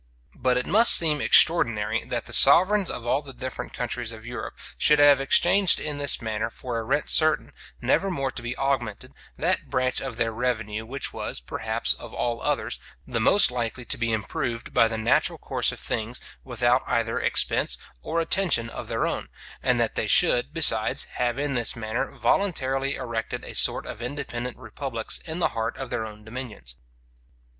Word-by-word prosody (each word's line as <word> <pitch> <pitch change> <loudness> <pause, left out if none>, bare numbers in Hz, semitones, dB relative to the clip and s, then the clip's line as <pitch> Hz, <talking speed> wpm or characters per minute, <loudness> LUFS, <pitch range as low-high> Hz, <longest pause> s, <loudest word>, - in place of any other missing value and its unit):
But 125 0 0
it 125 - -1
must 225 +5 +8
seem 150 -3 +3
extraordinary, 120 -13 +4
that - - -4
the - - -6
sovereigns 195 +2 +6
of 120 - -5
all 130 +4 0
the 140 -2 -12
different 130 +1 -6
countries 120 -1 -4
of 110 0 -12
Europe 120 +1 -7 0.2
should 150 - +3
have 145 -1 +5
exchanged 175 +6 +3
in 150 -1 -5
this 140 -3 +1
manner 110 0 -3
for 120 0 -6
a - - -5
rent 130 +6 -1
certain, 155 -1 +3 0.3
never 160 +10 +1
more 135 -7 -3
to - - -8
be 120 +2 -5
augmented, 130 -6 -3 0.2
that - - 0
branch 130 0 -1
of 130 -4 -6
their 115 -2 0
revenue, 110 -2 -3
which 135 +2 -5
was, - - -4
perhaps, - - -2
of - - -11
all 120 -1 -2
others, 60 - -2 0.3
the 120 -2 -3
most 125 - +5
likely 120 0 -4
to - - +5
be 115 -1 -1
improved 115 +2 -4
by 115 - +4
the 110 0 -4
natural 110 +1 0
course - - -1
of - - -10
things, 115 +3 -2 0.2
without 125 0 +1
either 115 -1 -1
expense - - +1 0.2
or 165 - -3
attention 165 -9 +1
of - - -8
their - - -2
own; - - -4 0.3
and - - +1
that - - 0
they - - -3
should, 125 +3 +3
besides, 130 -9 +3 0.2
have 120 0 0
in 145 0 -2
this 120 -3 +1
manner 115 +3 -3
voluntarily 135 -8 -1
erected 115 -2 -5
a - - -8
sort - - +3
of 110 - -8
independent 125 -1 -5
republics 120 -1 -3
in 160 0 -6
the 175 - +1
heart 115 0 -4
of 135 - -7
their 110 -2 -3
own 105 0 -13
dominions. 110 - -7
125 Hz, 185 wpm, -24 LUFS, 115-140 Hz, 0.3 s, must